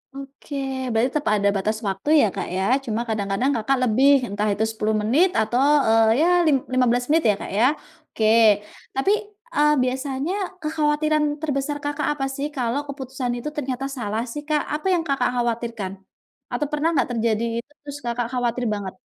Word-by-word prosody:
Oke, 275 Hz, +1 st, -9 dB, 0.4 s
berarti 225 Hz, +3 st, +2 dB
tepa 290 Hz, -, -1 dB
ada 200 Hz, 0 st, +2 dB
batas 215 Hz, +3 st, -1 dB
waktu 195 Hz, +8 st, -3 dB
ya -, -, +5 dB
Kak -, -, -3 dB
ya, 190 Hz, -, 0 dB, 0.2 s
cuma 225 Hz, 0 st, -1 dB
kadang-kadang 215 Hz, +4 st, 0 dB
Kakak 240 Hz, +4 st, +1 dB
lebih, 255 Hz, +4 st, +4 dB, 0.2 s
entah 205 Hz, +2 st, -1 dB
itu 210 Hz, +2 st, -1 dB
10 220 Hz, 0 st, -1 dB
menit 265 Hz, -, +3 dB
atau, 220 Hz, +3 st, 0 dB, 0.3 s
eee, 225 Hz, 0 st, +5 dB, 0.2 s
ya -, -, +4 dB, 0.2 s
lim 300 Hz, -, +5 dB, 0.2 s
lima 255 Hz, 0 st, +3 dB
belas 245 Hz, +1 st, +1 dB
menit 325 Hz, +1 st, +3 dB
ya 205 Hz, -, +3 dB
Kak -, -, -6 dB
ya, 235 Hz, -, +5 dB, 0.4 s
oke. 220 Hz, -, -1 dB, 0.7 s
Tapi, 270 Hz, +9 st, +2 dB, 0.4 s
eee, 300 Hz, 0 st, +4 dB
biasanya 265 Hz, +5 st, -2 dB, 0.3 s
kekhawatiran 305 Hz, 0 st, +1 dB, 0.2 s
terbesar 290 Hz, -1 st, -1 dB
Kakak 290 Hz, +1 st, -2 dB
apa 270 Hz, -2 st, -2 dB
sih, 280 Hz, +1 st, -2 dB
kalau 245 Hz, 0 st, -1 dB
keputusan 265 Hz, -2 st, -4 dB
itu 240 Hz, +5 st, -4 dB
ternyata 270 Hz, -2 st, -3 dB
salah 220 Hz, -1 st, -2 dB
sih 295 Hz, -, -5 dB
Kak? 305 Hz, -1 st, +1 dB, 0.2 s
Apa 345 Hz, -, -4 dB
yang 335 Hz, -, 0 dB
Kakak 275 Hz, -3 st, +1 dB
khawatirkan? 235 Hz, -4 st, -2 dB, 0.6 s
Atau 295 Hz, -, -1 dB
pernah 300 Hz, +1 st, 0 dB
nggak 265 Hz, -3 st, +1 dB
terjadi 230 Hz, -1 st, 0 dB, 0.2 s
itu, 245 Hz, -, -11 dB
terus 285 Hz, -1 st, -7 dB
Kakak 240 Hz, 0 st, -1 dB
khawatir 245 Hz, -1 st, -1 dB
banget? 200 Hz, -2 st, -5 dB
250 Hz, 175 wpm, -23 LUFS, 225-290 Hz, 0.7 s, ya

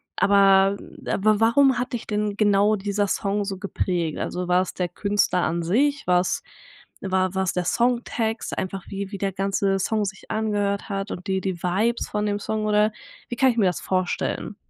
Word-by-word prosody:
aber 195 Hz, 0 st, +4 dB, 0.3 s
aber 215 Hz, +1 st, +2 dB
wa 225 Hz, -, +5 dB
warum 265 Hz, +2 st, +4 dB
hat 250 Hz, 0 st, -3 dB
dich 235 Hz, -, -4 dB
denn 210 Hz, -1 st, -1 dB
genau 205 Hz, 0 st, +3 dB
dieser 205 Hz, 0 st, -1 dB
Song 200 Hz, +1 st, -1 dB
so 195 Hz, -1 st, -4 dB
geprägt? 180 Hz, -4 st, -2 dB
Also 180 Hz, 0 st, -3 dB
war 180 Hz, +1 st, +3 dB
's -, -, -7 dB
der 180 Hz, -1 st, -1 dB
Künstler 200 Hz, -1 st, 0 dB
an 170 Hz, +2 st, -1 dB
sich, 280 Hz, -, +1 dB
war 180 Hz, 0 st, +4 dB
's -, -, -2 dB, 0.6 s
war 185 Hz, -1 st, 0 dB
war 190 Hz, 0 st, +1 dB
's -, -, 0 dB
der 180 Hz, -1 st, -1 dB
Songtext, 235 Hz, -2 st, 0 dB
einfach 190 Hz, 0 st, -4 dB
wie 195 Hz, 0 st, -5 dB
wie 200 Hz, -, -5 dB
der 195 Hz, 0 st, -1 dB
ganze 195 Hz, 0 st, 0 dB
Song 215 Hz, +2 st, 0 dB
sich 195 Hz, 0 st, -8 dB
angehört 205 Hz, -2 st, -1 dB
hat 195 Hz, 0 st, -3 dB
und 180 Hz, -, -6 dB
die 190 Hz, 0 st, 0 dB
die 185 Hz, -2 st, -3 dB
Vibes 210 Hz, +7 st, 0 dB
von 210 Hz, 0 st, -2 dB
dem 205 Hz, 0 st, 0 dB
Song 215 Hz, +1 st, -2 dB
oder 210 Hz, 0 st, +3 dB, 0.4 s
wie 240 Hz, -, -4 dB
kann 265 Hz, +1 st, +4 dB
ich 235 Hz, -, -7 dB
mir 210 Hz, -, +3 dB
das 180 Hz, -, 0 dB
vorstellen? 185 Hz, -2 st, -2 dB
200 Hz, 200 wpm, -24 LUFS, 190-215 Hz, 0.6 s, wa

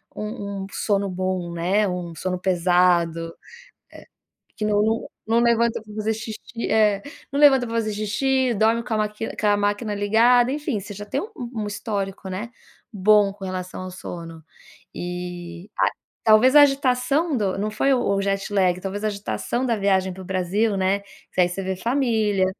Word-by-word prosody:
um 205 Hz, -3 st, -5 dB
um -, -, -7 dB
sono 200 Hz, -2 st, 0 dB
bom 185 Hz, -1 st, -2 dB
né, 190 Hz, +5 st, +1 dB
um 180 Hz, -2 st, -4 dB
sono 185 Hz, +3 st, -2 dB
pesado 175 Hz, -2 st, +2 dB
eh -, -, -22 dB, 1.1 s
que 215 Hz, -, -3 dB
não 215 Hz, +2 st, +1 dB, 0.2 s
não 230 Hz, +1 st, +3 dB
levanta 235 Hz, -1 st, +2 dB
pra 210 Hz, -1 st, -13 dB
fazer 215 Hz, +1 st, 0 dB
xixi 220 Hz, +1 st, -6 dB
É, 210 Hz, -2 st, +3 dB, 0.3 s
não 280 Hz, -, -2 dB
levanta 270 Hz, -4 st, +6 dB
pra 230 Hz, -, -4 dB
fazer 215 Hz, -2 st, 0 dB
xixi, 245 Hz, +5 st, +1 dB
dorme 225 Hz, +2 st, +2 dB
com 235 Hz, -, -4 dB
a -, -, +1 dB
máqui 210 Hz, +1 st, -3 dB
com 210 Hz, -, 0 dB
a 205 Hz, 0 st, +4 dB
máquina 205 Hz, +1 st, -1 dB
ligada, 235 Hz, +4 st, +4 dB
enfim, 290 Hz, -6 st, -2 dB
você 205 Hz, +1 st, -8 dB
já 205 Hz, +1 st, -7 dB
tem -, -, -2 dB
um- 435 Hz, +3 st, -6 dB, 0.3 s
um -, -, -2 dB
histórico, 200 Hz, -2 st, -4 dB
né, 205 Hz, +5 st, -5 dB, 0.4 s
bom 205 Hz, 0 st, +4 dB
com 200 Hz, -1 st, -12 dB
relação 185 Hz, 0 st, -5 dB
ao 185 Hz, -, -7 dB
sono. 165 Hz, -3 st, -8 dB, 0.5 s
Eh, 175 Hz, 0 st, -6 dB
a -, -, +3 dB, 0.4 s
talvez 225 Hz, +6 st, +5 dB
a 295 Hz, -, +10 dB
agitação 275 Hz, +2 st, +2 dB
do 195 Hz, -4 st, 0 dB
não 210 Hz, +2 st, -1 dB
foi 270 Hz, +6 st, +1 dB
o 250 Hz, -, +2 dB, 0.2 s
o 195 Hz, -, 0 dB
jet 195 Hz, +1 st, -2 dB
lag, 185 Hz, -2 st, +2 dB
talvez, 195 Hz, +2 st, -5 dB
a 215 Hz, -, +2 dB
agitação 215 Hz, +4 st, -2 dB
da 235 Hz, -2 st, +1 dB
viagem 190 Hz, -2 st, +1 dB
para 190 Hz, -, -10 dB
o -, -, -11 dB
Brasil, 195 Hz, +3 st, +1 dB
né. 190 Hz, +1 st, +1 dB, 0.3 s
Que 185 Hz, -, +3 dB
aí 175 Hz, -, +3 dB
você 195 Hz, +2 st, -4 dB
vê 190 Hz, 0 st, -2 dB
família, 220 Hz, -4 st, +1 dB
205 Hz, 185 wpm, -23 LUFS, 185-225 Hz, 1.1 s, a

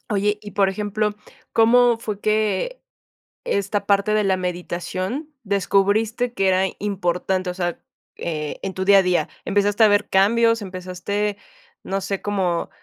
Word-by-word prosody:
Oye, 205 Hz, +1 st, +1 dB
y 205 Hz, -, -9 dB
por 195 Hz, -1 st, +3 dB
ejemplo, 210 Hz, +1 st, -1 dB, 0.4 s
¿cómo 240 Hz, +1 st, +5 dB
fue 210 Hz, -3 st, -5 dB
que 215 Hz, -, 0 dB, 0.6 s
esta 200 Hz, 0 st, -1 dB
parte 200 Hz, +1 st, +2 dB
de 215 Hz, -1 st, +2 dB
la 190 Hz, -1 st, +2 dB
meditación, 185 Hz, -, -4 dB
descubriste 205 Hz, +4 st, +1 dB
que 195 Hz, -3 st, +1 dB
era 185 Hz, 0 st, +3 dB, 0.2 s
importante?, 185 Hz, -2 st, -1 dB
o -, -, -3 dB
sea, 175 Hz, -2 st, -3 dB, 0.4 s
e 155 Hz, -3 st, -4 dB
en 190 Hz, -1 st, -4 dB
tu 190 Hz, 0 st, -2 dB
día 200 Hz, 0 st, +7 dB
a -, -, +3 dB
día, 180 Hz, -1 st, +1 dB, 0.2 s
¿empezaste 205 Hz, +2 st, +2 dB
a -, -, +8 dB
ver 205 Hz, 0 st, +2 dB
cambios, 230 Hz, +3 st, +3 dB
empezaste, 190 Hz, +2 st, -3 dB, 0.5 s
no 195 Hz, 0 st, -2 dB
sé, 195 Hz, 0 st, -3 dB
cómo 185 Hz, -4 st, -1 dB
200 Hz, 150 wpm, -22 LUFS, 185-210 Hz, 0.6 s, a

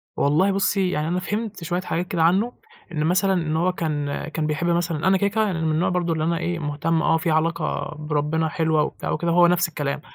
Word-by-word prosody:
والله 155 Hz, +8 st, +2 dB
بُصي 195 Hz, -1 st, +1 dB
يعني 155 Hz, -4 st, -1 dB
أنا 180 Hz, +2 st, 0 dB
فهمت 205 Hz, 0 st, -4 dB
شويّة 175 Hz, +2 st, -1 dB
حاجات 180 Hz, -1 st, -2 dB
كده 165 Hz, -2 st, 0 dB
عنّه، 195 Hz, +9 st, +2 dB, 0.4 s
إن 155 Hz, -3 st, -1 dB
مثلًا 190 Hz, +3 st, +2 dB
إن 165 Hz, -4 st, -1 dB
هو 175 Hz, +3 st, +2 dB
كان 145 Hz, -4 st, -3 dB
كان 155 Hz, -1 st, -2 dB
بيحب 155 Hz, +3 st, -1 dB
مثلًا 170 Hz, -1 st, 0 dB
أنا 190 Hz, 0 st, +4 dB
كده 200 Hz, -, +1 dB
كده 220 Hz, +2 st, +1 dB
يعني 180 Hz, -6 st, -2 dB
من 160 Hz, -, +1 dB
النوع 155 Hz, +3 st, +1 dB
برضه 175 Hz, -2 st, 0 dB
اللي 155 Hz, -1 st, -2 dB
أنا 170 Hz, +1 st, +1 dB
إيه 175 Hz, 0 st, -2 dB
مهتم 155 Hz, +2 st, -1 dB
آه 165 Hz, -, +3 dB
في 160 Hz, 0 st, -1 dB
علاقة 160 Hz, 0 st, -1 dB
بربّنا 150 Hz, +1 st, -1 dB
حلوة 160 Hz, -2 st, +1 dB
وبتاع -, -, -4 dB
وكده 170 Hz, -1 st, 0 dB
وهو 175 Hz, +1 st, +6 dB
نَفْس 175 Hz, +1 st, +2 dB
الكلام، 145 Hz, -2 st, -3 dB
165 Hz, 225 wpm, -23 LUFS, 155-180 Hz, 0.4 s, وهو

